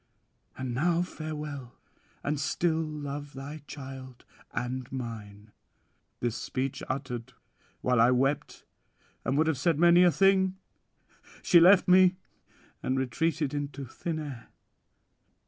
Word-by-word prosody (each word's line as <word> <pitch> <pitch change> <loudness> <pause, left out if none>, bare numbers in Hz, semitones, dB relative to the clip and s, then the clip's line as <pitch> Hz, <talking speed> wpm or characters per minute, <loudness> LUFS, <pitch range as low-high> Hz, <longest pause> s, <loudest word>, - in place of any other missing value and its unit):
And 130 -2 -3
now 170 +6 +2
farewell, 150 -6 -6 0.5
and 145 0 -1
still 160 +2 0
love 145 -2 -5
thy 140 +3 -7
child 130 -3 -9 0.3
and 125 +1 -4
mine." 110 -5 -7 0.7
This 120 -2 -1
speech 130 +2 -3
uttered, 130 -3 -4 0.5
while 125 -2 +3
I 120 - +6
wept 135 +3 0 0.6
and 135 +3 0
would 155 - +4
have 160 -5 0
said 165 +1 +2
many 175 +2 +6
a 180 - +7
thing, 190 +3 +3 0.9
she 175 - +7
left 180 +3 +7
me 185 0 +6 0.7
and 130 - -1
retreated 150 +3 0
into 145 -1 -4
thin 160 +6 -4
air. 140 -7 -7
145 Hz, 120 wpm, -29 LUFS, 130-160 Hz, 0.9 s, a